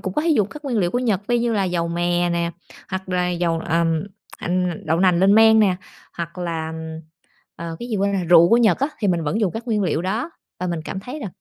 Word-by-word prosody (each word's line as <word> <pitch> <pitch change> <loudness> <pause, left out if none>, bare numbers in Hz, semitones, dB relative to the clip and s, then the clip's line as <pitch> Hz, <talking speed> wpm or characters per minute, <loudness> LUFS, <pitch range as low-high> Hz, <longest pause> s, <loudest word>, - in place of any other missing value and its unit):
cũng 190 - -4
có 300 - +1
thể 335 - 0
dùng 215 - +3
các 300 +5 -11
nguyên 250 -5 -1
liệu 175 -3 +1
của 245 - 0
Nhật 210 -5 -1
vi 240 0 +2
như 235 0 0
là 200 -3 +1
dầu 175 -2 -1
mè 175 +1 0
nè, 170 0 0 0.4
hoặc 190 0 -5
là 180 -1 0
dầu, 170 -1 0
ờm, 165 -1 0 0.4
ừm, 180 -1 -1
đậu 160 +2 +1
nành 180 -2 +4
lên 195 +2 +5
men 220 0 +7
nè, 190 -4 +3 0.4
hoặc 170 +1 -6
là, 165 -3 -3
ừm, 160 0 -7 0.6
ờ, 165 -1 -6
cái 240 - -7
gì 220 - -1
quên 200 0 +1
rồi 190 -2 -1
rượu 170 0 +6
của 230 - +5
Nhật 220 -7 +3
á. 275 - +1
Thì 205 - 0
mình 175 -2 +1
vẫn 205 +9 -1
dùng 200 -5 +1
các 225 +2 -6
nguyên 215 -3 0
liệu 170 -2 0
đó, 220 - -2 0.3
và 180 - -1
mình 170 -2 -2
cảm 190 - -5
thấy 255 +9 -7
là 220 - -4
180 Hz, 265 wpm, -21 LUFS, 170-220 Hz, 0.6 s, men